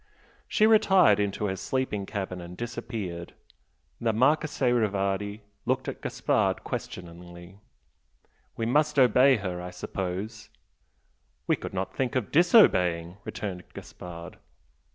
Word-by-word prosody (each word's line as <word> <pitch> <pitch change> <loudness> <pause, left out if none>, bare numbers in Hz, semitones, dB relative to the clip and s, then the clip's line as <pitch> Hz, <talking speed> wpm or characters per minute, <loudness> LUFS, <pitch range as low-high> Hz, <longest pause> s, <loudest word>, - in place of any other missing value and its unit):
She 215 - +3
retired 195 - +5
into 100 0 -1
her 95 -2 -1
sleeping 105 -2 -2
cabin 95 -3 -4
and 85 +1 -10
disappeared. 115 -7 -5 0.6
The 115 -1 +1
Marchese 130 +2 +2
Rivardi 100 -2 0 0.3
looked - - 0
at - - -5
Gaspard - - 0
questioningly. 85 +1 -8 1.0
"We 115 - -1
must 150 +5 +2
obey 130 +1 +6
her, 90 -5 -4
I 90 - -6
suppose?" 95 +4 -5 1.0
"We - - +2
could - - -8
not 95 +1 -3
think 130 -2 -1
of 125 -5 -1
disobeying!" 90 - +4
returned 100 -4 -5
Gaspard. 85 0 -9
105 Hz, 115 wpm, -27 LUFS, 90-125 Hz, 1.0 s, obey